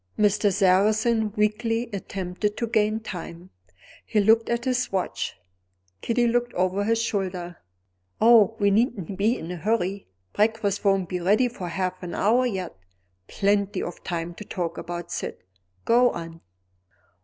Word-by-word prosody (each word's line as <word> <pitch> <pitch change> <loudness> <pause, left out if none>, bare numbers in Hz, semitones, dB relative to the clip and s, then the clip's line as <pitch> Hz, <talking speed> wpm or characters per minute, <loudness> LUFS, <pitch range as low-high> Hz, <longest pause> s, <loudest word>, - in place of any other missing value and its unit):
Mr. 205 0 +3
Sarrazin 215 +3 +3
weakly 225 +3 0
attempted 195 +1 -3
to 235 - -1
gain 220 -1 +1
time: 180 -3 -8 0.5
he 215 - 0
looked 225 +2 +4
at 235 +1 -1
his 250 -1 0
watch. 190 -2 -2 0.7
Kitty 240 +1 +1
looked 240 0 0
over 185 +2 +1
his 230 +1 +2
shoulder: 185 -6 -3 0.6
"Oh, 225 -2 +6
we 200 -1 +3
needn't 205 - 0
be 215 +6 +1
in 165 - -7
a 180 - -5
hurry; 200 0 -1 0.3
breakfast 210 -2 +1
won't 195 -3 +2
be 180 0 -3
ready 205 +8 +3
for 215 -7 -6
half 185 +1 -3
an 175 -2 -6
hour 240 +5 +3
yet. 190 - -4 0.5
Plenty 200 0 0
of 175 - -7
time 170 0 -3
to 210 - -9
talk 175 -4 -4
of - - -9 0.2
Syd; - - -4 0.5
go 245 +1 +5
on." 165 -3 -7
205 Hz, 145 wpm, -25 LUFS, 185-225 Hz, 0.7 s, Oh